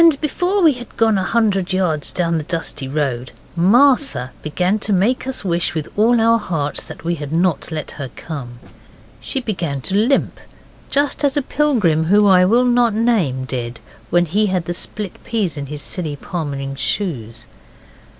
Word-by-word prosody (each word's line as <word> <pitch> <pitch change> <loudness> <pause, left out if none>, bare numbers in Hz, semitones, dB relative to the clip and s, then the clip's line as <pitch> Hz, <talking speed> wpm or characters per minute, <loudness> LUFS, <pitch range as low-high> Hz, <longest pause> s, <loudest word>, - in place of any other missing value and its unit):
And 320 -4 +5
before 360 +6 0
we 315 -3 +6
had 245 -2 -11
gone 220 -3 +3
a - - -1
hundred 195 -4 +1
yards 170 -6 0
down 170 -2 0
the - - -4
dusty 150 -5 -3
road 135 -4 -2 0.2
Martha 240 - +3
began 180 +7 0
to 210 - -1
make 210 +8 +1
us 260 -5 -4
wish 170 -1 +1
with 155 -2 -2
all 230 +3 +4
our 230 +1 +4
hearts 155 -8 -2 0.2
we 170 +1 0
had 150 -3 -6
not 170 +1 0
let 155 -2 -4
her 135 - -4
come. 130 -7 -7 0.6
She 270 - -3
began 170 - -3
to 190 - -2
limp, 235 +7 +1 0.5
just 285 +1 0
as 285 0 +2
a 290 - +1
pilgrim, 215 - +1
who 205 +5 +4
I 180 -2 +6
will 235 +6 +4
not 240 -3 +3
name, 195 - +1
did 120 -2 -4 0.3
when 175 0 +3
he 205 +6 +1
had 185 -3 -1
the 175 - -2
split 200 +2 -5
peas 210 -9 -1
in 140 -1 -5
his 145 0 -6
silly 160 -5 -3
palmering 140 -4 -4
shoes. 130 - -3
180 Hz, 175 wpm, -19 LUFS, 150-230 Hz, 0.6 s, we